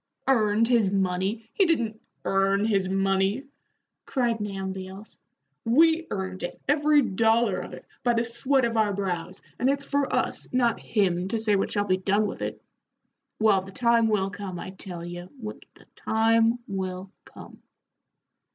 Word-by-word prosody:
"Earned 220 -3 +3
his 230 -5 +3
money? 195 +3 -1
He 390 - +3
didn't 230 -9 0 0.2
earn 195 +1 +2
his 195 -4 +1
money," 195 +4 +1 0.6
cried 235 -4 0
Nahum 195 -2 -4
Beals. 190 +2 -10 0.4
"We 320 +7 +4
earned 190 -1 -4
it, 175 - -5
every 295 0 +4
dollar 225 0 +2
of - - -8
it, - - -13 0.2
by 240 -1 +2
the 230 +1 +1
sweat 255 +3 +1
of 230 -1 -1
our 210 -2 +2
brows, 190 -2 -4 0.2
and 255 - +2
it's 280 0 0
for 280 -1 0
us, - - -1
not 245 -2 +2
him, 185 -4 0
to 225 +3 -1
say 215 -2 +2
what 195 - 0
shall 205 -1 0
be 185 -2 +2
done 200 +3 +1
with 205 - -5
it. - - -4 0.8
Well, 215 -3 +4
the 190 +1 -11
time 235 +1 +3
will 195 -3 0
come, 190 -3 -6
I 185 - -7
tell 180 -3 -7
ye, 175 +1 -7 0.2
the 215 - -10
time 225 +1 +2
will 190 -1 -4
come." - - -14
210 Hz, 160 wpm, -26 LUFS, 190-235 Hz, 0.8 s, We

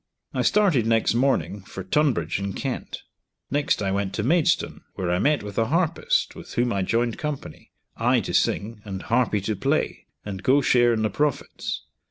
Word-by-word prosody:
I - - 0
started 185 - +3
next 115 -1 +3
morning 125 -4 +1
for 95 +1 -8
Tunbridge, 95 - +1
in 100 0 -3
Kent; - - -4 0.5
next 140 -6 +1
I 95 - 0
went 100 0 -1
to 105 - -1
Maidstone, 160 +6 +1
where 90 -2 -2
I 90 - +1
met 145 +1 +2
with 105 0 -4
a 115 - +2
harpist 165 +3 +1
with - - -10
whom 120 0 +1
I 100 - 0
joined 115 +4 0
company, 150 -3 -6 0.2
I - - +3
to - - -5
sing, 105 +1 0
and 95 -2 -6
harpy 115 -3 +1
to 105 +3 -2
play, 95 - -1 0.2
and 95 -2 -5
go 130 +7 +4
share 120 -3 +4
in 110 -1 0
the 110 - 0
profits. 145 +4 -2
115 Hz, 185 wpm, -24 LUFS, 100-140 Hz, 0.5 s, go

